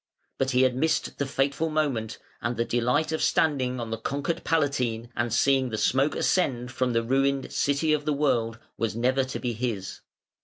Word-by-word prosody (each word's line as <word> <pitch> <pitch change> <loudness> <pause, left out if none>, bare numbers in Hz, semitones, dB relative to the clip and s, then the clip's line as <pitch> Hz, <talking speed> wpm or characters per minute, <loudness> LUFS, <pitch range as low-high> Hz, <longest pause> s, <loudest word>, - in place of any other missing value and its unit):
But 135 - +1
he 130 0 +3
had 130 -1 +2
missed 160 +5 0
the 140 - 0
fateful 140 +4 0
moment, 135 -8 -1 0.2
and 115 0 -2
the 115 - +1
delight 125 +7 +1
of 160 - -1
standing 130 -5 +1
on 115 -1 -5
the 115 - -3
conquered 140 +7 -2
Palatine, 125 -7 0
and 115 +1 -1
seeing 130 +2 +3
the 110 - -3
smoke 135 +7 +2
ascend 125 -9 0
from 125 -1 0
the 115 0 +1
ruined 135 +2 +1
City 145 +2 +1
of 150 -1 -1
the 150 - +1
World, 125 -6 +1 0.2
was 110 -3 -1
never 130 +3 +2
to 130 - -5
be 120 -1 -2
his. 110 -5 -4
130 Hz, 190 wpm, -26 LUFS, 115-140 Hz, 0.2 s, he